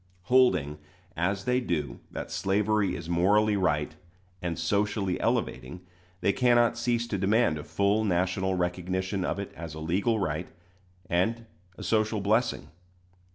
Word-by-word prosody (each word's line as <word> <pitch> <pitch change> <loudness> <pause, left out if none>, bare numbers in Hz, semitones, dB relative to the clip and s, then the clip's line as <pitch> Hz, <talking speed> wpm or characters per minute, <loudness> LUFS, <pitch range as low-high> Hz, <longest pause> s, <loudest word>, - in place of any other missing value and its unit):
Holding, 90 - +3 0.4
as 95 +4 -1
they 125 0 +2
do, 75 - -3
that - - -6
slavery 105 +1 +1
is 85 - -7
morally 100 +5 +3
right 75 -6 0 0.5
and 85 -2 -3
socially 100 -2 0
elevating, 75 +8 -2 0.4
they 100 - +2
cannot 120 -2 +3
cease 120 0 0
to 100 - -2
demand 100 -4 +2
a - - -7
full 100 +6 +1
national 95 0 0
recognition 90 +2 -2
of 90 - -1
it 100 -1 -6
as 80 -3 -8
a - - -7
legal 100 +8 0
right 85 -2 -2 0.6
and 110 +7 0 0.3
a - - -8
social 110 -1 +1
blessing. 110 +5 0
95 Hz, 140 wpm, -28 LUFS, 85-110 Hz, 0.6 s, Holding